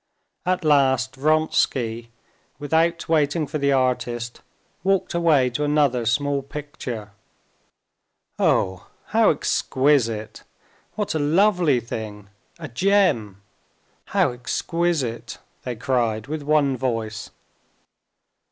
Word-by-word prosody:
At 185 Hz, -2 st, 0 dB
last 130 Hz, -3 st, +3 dB
Vronsky, 130 Hz, -6 st, 0 dB, 0.5 s
without 160 Hz, +4 st, 0 dB
waiting 155 Hz, 0 st, +1 dB
for 150 Hz, +2 st, -4 dB
the 140 Hz, 0 st, +2 dB
artist, 120 Hz, -3 st, -1 dB, 0.4 s
walked 195 Hz, 0 st, +1 dB
away 155 Hz, -7 st, +3 dB
to 150 Hz, +5 st, -2 dB
another 145 Hz, -5 st, +2 dB
small 140 Hz, +2 st, +1 dB
picture. 135 Hz, -7 st, -7 dB, 1.3 s
"Oh, 95 Hz, -1 st, +1 dB, 0.3 s
how -, -, +5 dB
exquisite! 125 Hz, -6 st, +1 dB, 0.5 s
What 210 Hz, -2 st, -2 dB
a 160 Hz, -, -1 dB
lovely 170 Hz, -2 st, +3 dB
thing! 105 Hz, -3 st, -7 dB, 0.3 s
A 160 Hz, -2 st, -7 dB
gem! 120 Hz, -, +1 dB, 0.6 s
How -, -, +1 dB
exquisite!" 125 Hz, -2 st, -2 dB, 0.2 s
they 125 Hz, -1 st, -4 dB
cried 115 Hz, -3 st, -1 dB
with 155 Hz, +3 st, -4 dB
one 145 Hz, -2 st, +2 dB
voice. 115 Hz, -4 st, -3 dB
135 Hz, 95 wpm, -23 LUFS, 120-155 Hz, 1.3 s, how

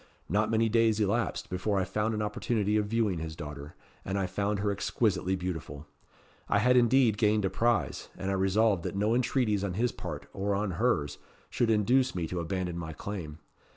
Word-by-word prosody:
Not 105 Hz, +5 st, +1 dB
many 115 Hz, 0 st, +2 dB
days 110 Hz, -1 st, +3 dB
elapsed 105 Hz, -4 st, -1 dB
before 95 Hz, +3 st, 0 dB
I -, -, +1 dB
found 105 Hz, +4 st, -1 dB
an 105 Hz, -, -1 dB
opportunity 105 Hz, 0 st, 0 dB
of 105 Hz, -1 st, +1 dB
viewing 105 Hz, -5 st, 0 dB
his 80 Hz, 0 st, -5 dB
daughter, 75 Hz, -1 st, -8 dB, 0.3 s
and 95 Hz, +1 st, -2 dB
I 95 Hz, -, 0 dB
found 100 Hz, +3 st, -1 dB
her 100 Hz, +1 st, 0 dB
exquisitely 95 Hz, -2 st, 0 dB
beautiful. 80 Hz, -5 st, -5 dB, 0.6 s
I -, -, +3 dB
had 125 Hz, +5 st, +4 dB
indeed 120 Hz, -3 st, +4 dB
gained 105 Hz, -2 st, +3 dB
a 95 Hz, -, 0 dB
prize; 115 Hz, +2 st, 0 dB
and 95 Hz, +1 st, -2 dB
I -, -, +1 dB
resolved 95 Hz, +1 st, +2 dB
that -, -, -4 dB
no 105 Hz, +3 st, +1 dB
entreaties 120 Hz, -4 st, +1 dB
on 95 Hz, -3 st, -2 dB
his 120 Hz, +3 st, +1 dB
part, -, -, -7 dB
or 100 Hz, +1 st, -1 dB
on 100 Hz, 0 st, -1 dB
hers, 80 Hz, -13 st, +1 dB, 0.3 s
should 120 Hz, -, +1 dB
induce 125 Hz, +5 st, +3 dB
me 85 Hz, -2 st, -1 dB
to 90 Hz, -, -3 dB
abandon 90 Hz, 0 st, -3 dB
my 80 Hz, -1 st, -5 dB
claim. 80 Hz, -4 st, -6 dB
100 Hz, 190 wpm, -29 LUFS, 90-110 Hz, 0.6 s, had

